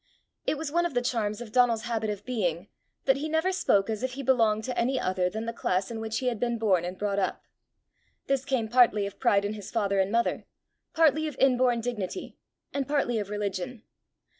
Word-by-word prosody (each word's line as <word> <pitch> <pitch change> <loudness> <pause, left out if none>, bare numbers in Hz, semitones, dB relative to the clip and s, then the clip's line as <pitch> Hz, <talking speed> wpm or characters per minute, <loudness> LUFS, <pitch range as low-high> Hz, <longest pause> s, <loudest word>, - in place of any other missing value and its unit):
It 305 - +1
was 300 -1 -4
one 345 +2 +2
of 280 - -11
the 245 - +3
charms 225 -3 -1
of 230 -3 -8
Donal's 235 -2 +3
habit 225 -2 -2
of 205 -1 -5
being, 185 -7 -2 0.4
that 270 0 +4
he 305 +3 -3
never 320 +4 +1
spoke 200 - +2
as 220 -2 -3
if 260 0 -2
he 275 +1 -5
belonged 225 -4 +3
to 255 +1 -3
any 255 +2 +1
other 185 -1 0
than 220 +4 -4
the 230 - -3
class 190 -2 -1
in 225 - -4
which 220 0 -3
he 260 - -3
had 240 -4 0
been 240 -1 0
born 195 -6 +2
and 180 +1 -5
brought 200 0 -1
up. 190 - -2 0.8
This 275 -1 0
came 260 -5 0
partly 225 -3 +4
of 200 - -7
pride 205 -6 +3
in 205 - -2
his 205 -2 -8
father 200 -3 0
and 190 +1 +1
mother, 235 +1 0 0.5
partly 315 -1 +4
of 300 - -5
inborn 250 -3 +3
dignity, 235 - -4 0.4
and 280 -1 -1
partly 275 -6 +1
of 205 -2 -4
religion. 205 +2 -4
230 Hz, 215 wpm, -28 LUFS, 205-260 Hz, 0.8 s, that